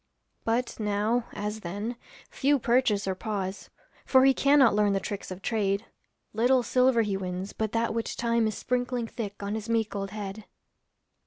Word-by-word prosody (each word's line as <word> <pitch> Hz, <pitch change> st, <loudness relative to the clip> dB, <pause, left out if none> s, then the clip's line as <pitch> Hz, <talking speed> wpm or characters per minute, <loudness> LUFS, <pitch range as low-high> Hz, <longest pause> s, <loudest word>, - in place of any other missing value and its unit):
But 235 Hz, +2 st, -1 dB
now, 215 Hz, +3 st, 0 dB
as 210 Hz, +1 st, -4 dB
then, 205 Hz, +6 st, -4 dB, 0.4 s
few 285 Hz, +1 st, +2 dB
purchase 235 Hz, -5 st, +2 dB
or 190 Hz, -, +1 dB
pause, 195 Hz, -1 st, -4 dB, 0.3 s
For 260 Hz, 0 st, +5 dB
he 270 Hz, -, +6 dB
cannot 275 Hz, -4 st, +5 dB
learn 205 Hz, -1 st, +3 dB
the 195 Hz, -, +1 dB
tricks 200 Hz, +1 st, -5 dB
of 185 Hz, +1 st, -8 dB
trade; 205 Hz, -2 st, 0 dB, 0.5 s
Little 245 Hz, +3 st, +3 dB
silver 250 Hz, 0 st, +3 dB
he 205 Hz, -2 st, -1 dB
wins, 185 Hz, 0 st, -4 dB
but 220 Hz, -1 st, -2 dB
that 230 Hz, -1 st, +1 dB
which 230 Hz, 0 st, -3 dB
time 235 Hz, -1 st, +2 dB
Is 215 Hz, -, -3 dB
sprinkling 250 Hz, -1 st, -1 dB
thick 210 Hz, -3 st, -6 dB
on 200 Hz, +1 st, -2 dB
his 220 Hz, +1 st, -4 dB
meek 225 Hz, -2 st, 0 dB
old 195 Hz, -1 st, -3 dB
head. 205 Hz, 0 st, -6 dB
220 Hz, 170 wpm, -28 LUFS, 200-240 Hz, 0.5 s, he